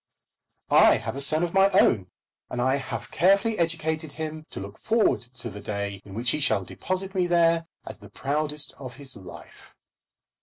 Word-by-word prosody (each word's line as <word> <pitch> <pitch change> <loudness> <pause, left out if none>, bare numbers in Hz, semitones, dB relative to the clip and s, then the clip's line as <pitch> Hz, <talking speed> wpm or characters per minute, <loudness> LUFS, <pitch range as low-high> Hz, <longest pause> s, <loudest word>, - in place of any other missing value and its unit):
I - - +7
have - - -5
a 140 - -3
son 155 +4 +2
of 175 - -2
my 195 0 +5
own, 95 -5 +3 0.4
and 125 - -4
I 130 +3 +2
have 130 -2 -6
carefully 200 +4 +3
educated 160 -2 -1
him 155 0 -6
to - - -7
look 100 +2 -9
forward 225 0 +2 0.2
to 125 -1 -5
the 105 +1 -9
day 100 -1 -4
in 100 -1 -11
which 120 +2 +2
he 150 - 0
shall 135 -9 +3
deposit 185 - -4
me 185 -2 +1
there 165 -1 +3 0.2
as - - -9
the - - -13
proudest 150 +1 -2
of 130 -3 -8
his 135 -2 -4
life. 95 -4 -13
150 Hz, 185 wpm, -26 LUFS, 120-170 Hz, 0.4 s, I